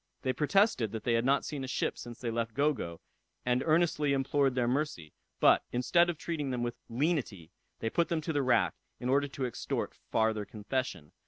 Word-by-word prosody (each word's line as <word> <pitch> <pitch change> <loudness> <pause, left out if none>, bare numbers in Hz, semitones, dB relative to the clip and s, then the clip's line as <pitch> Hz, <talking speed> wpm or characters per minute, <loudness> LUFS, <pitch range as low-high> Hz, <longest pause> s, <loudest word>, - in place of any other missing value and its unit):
They 130 - +1
protested 150 - +2
that 110 -1 -4
they 120 - +1
had 115 +1 +2
not 140 +1 +3
seen 145 -3 -4
a - - -4
ship 130 - -1
since 120 -1 -9
they 120 -2 -2
left 115 -1 -2
Gogo, 140 - 0 0.4
and 125 +1 +2
earnestly 155 -3 +2
implored 135 0 +2
their 125 -2 +1
mercy; 125 - -2 0.3
but, - - +5
instead 170 +8 +3
of 170 - -2
treating 150 -3 -3
them 125 -2 -1
with 120 0 -3
lenity, 120 - -1 0.3
they 115 - 0
put 170 -2 +1
them 170 - +1
to 160 +1 -3
the 145 - +2
rack, 120 -10 +3 0.3
in 125 - -2
order 140 +2 +3
to 135 -1 -4
extort 125 - -3 0.2
farther 110 -1 +1
confession. 105 - -4
130 Hz, 195 wpm, -31 LUFS, 115-150 Hz, 0.4 s, but